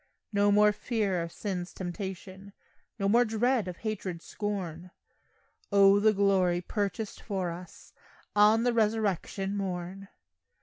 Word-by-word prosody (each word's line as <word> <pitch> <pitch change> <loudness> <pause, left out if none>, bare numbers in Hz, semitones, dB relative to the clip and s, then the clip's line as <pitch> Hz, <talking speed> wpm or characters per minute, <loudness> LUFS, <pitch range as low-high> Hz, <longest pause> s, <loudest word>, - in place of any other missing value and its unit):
No 205 0 +3
more 210 +1 +5
fear 210 -4 -1
of 165 0 -5
sin's 180 -3 -4
temptation, 190 +1 -7 0.4
No 195 -2 0
more 235 +4 +5
dread 225 -1 +1
of 180 -1 -6
hatred's 190 -6 -5
scorn, 185 -5 -4 0.8
O 200 0 +6
the 215 +1 +5
glory 195 -3 +2
purchased 205 +3 -3
for 190 -4 -2
us 175 0 -11 0.4
On 210 +2 +5
the 245 0 +2
resurrection 210 -3 0
morn! 190 0 -4
200 Hz, 125 wpm, -29 LUFS, 185-210 Hz, 0.8 s, O